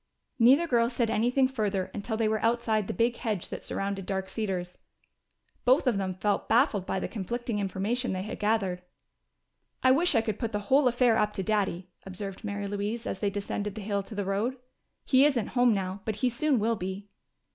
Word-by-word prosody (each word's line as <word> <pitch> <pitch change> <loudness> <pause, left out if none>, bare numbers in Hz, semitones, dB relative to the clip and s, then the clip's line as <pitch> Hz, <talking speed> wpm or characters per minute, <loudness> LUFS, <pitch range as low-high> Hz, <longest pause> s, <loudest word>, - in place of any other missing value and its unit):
Neither 265 +8 +6
girl 235 -6 +2
said 235 -2 0
anything 245 +5 +3
further 210 -7 -2
until 220 +2 -3
they 225 -1 +2
were 215 0 0
outside 225 -3 +1
the - - -2
big 235 +5 +1
hedge 210 -6 -3
that - - -6
surrounded 195 -1 -3
Dark 190 -1 -2
Cedars. 185 -5 -3 0.8
Both 260 +5 +4
of 235 -6 +2
them 190 -1 -2
felt 200 +3 -1
baffled 225 -6 +3
by 190 - -1
the - - -3
conflicting 230 +2 -3
information 205 +6 -1
they 185 0 -2
had 215 - -6
gathered. 205 -4 0 1.0
"I 255 - +6
wish 315 +3 +3
I 225 - +5
could 220 -2 -3
put 230 -3 -3
the 210 - 0
whole 275 -1 +6
affair 240 -2 +3
up 210 0 +1
to 190 - -3
Daddy," 190 -4 -1
observed 195 0 -7
Mary 205 -1 -3
Louise, 205 +3 -3
as 190 - -3
they 205 - +1
descended 205 0 -4
the 215 - -6
hill 200 0 -1
to 210 +3 -10
the 200 -1 -2
road. 210 +7 -1 0.5
"He 260 0 +5
isn't 270 -7 +2
home 245 -1 +3
now, 190 0 -3
but 220 - -2
he 245 +4 0
soon 280 +3 +1
will 225 +1 +1
be." 190 +2 -5
215 Hz, 200 wpm, -28 LUFS, 195-240 Hz, 1.0 s, Neither